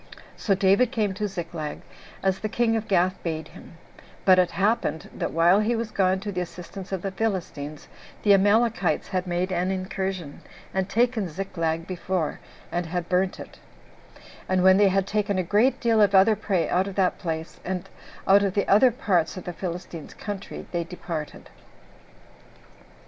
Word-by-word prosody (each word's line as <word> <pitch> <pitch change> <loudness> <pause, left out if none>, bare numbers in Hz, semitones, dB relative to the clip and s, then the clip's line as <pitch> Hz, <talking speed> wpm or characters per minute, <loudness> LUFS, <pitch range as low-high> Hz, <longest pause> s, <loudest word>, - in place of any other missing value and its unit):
So 200 - +1
David 200 +5 +4
came 215 -6 0
to 210 +2 -2
Ziklag, 165 -5 -5 0.4
as 190 -1 +1
the 215 - -3
king 225 +1 +1
of 220 -1 -2
Gath 185 -1 +1
bade 160 -2 -4
him; 165 - -14 0.5
but 185 -1 +7
it 180 - +3
happened, 195 -4 0
that - - -3
while 170 +4 +4
he 220 +3 +1
was 225 -1 -3
gone 190 -2 +2
to 205 0 -4
the 180 -2 -2
assistance 180 +2 -8
of 190 -2 -3
the 195 - -2
Philistines, 175 -8 -3 0.4
the 205 - +6
Amalekites 205 -3 +2
had 185 0 -2
made 180 +2 -1
an 180 +1 0
incursion, 190 -4 -4 0.3
and 190 0 -1
taken 230 -3 +1
Ziklag 165 -2 -2
before, 180 -3 -2 0.3
and 175 -1 -2
had 175 0 -3
burnt 185 +1 +1
it; - - -11 0.9
and 185 -1 +2
when 190 0 +7
they 205 0 +5
had 195 0 +1
taken 205 0 0
a 185 - +1
great 210 +9 +2
deal 230 -2 +3
of 200 -1 +4
other 200 +3 +6
prey 190 -4 0
out 185 +2 +1
of 195 - -6
that 190 -2 +1
place, 160 -3 -4
and 185 0 -4 0.4
out 200 +1 +7
of 200 -2 0
the 200 - +1
other 215 +6 +6
parts 190 -9 0
of 185 - -6
the 175 - -5
Philistines' 170 -2 -6
country, 200 -2 -6
they 175 -1 -1
departed. 165 -3 -7
190 Hz, 175 wpm, -25 LUFS, 175-205 Hz, 0.9 s, but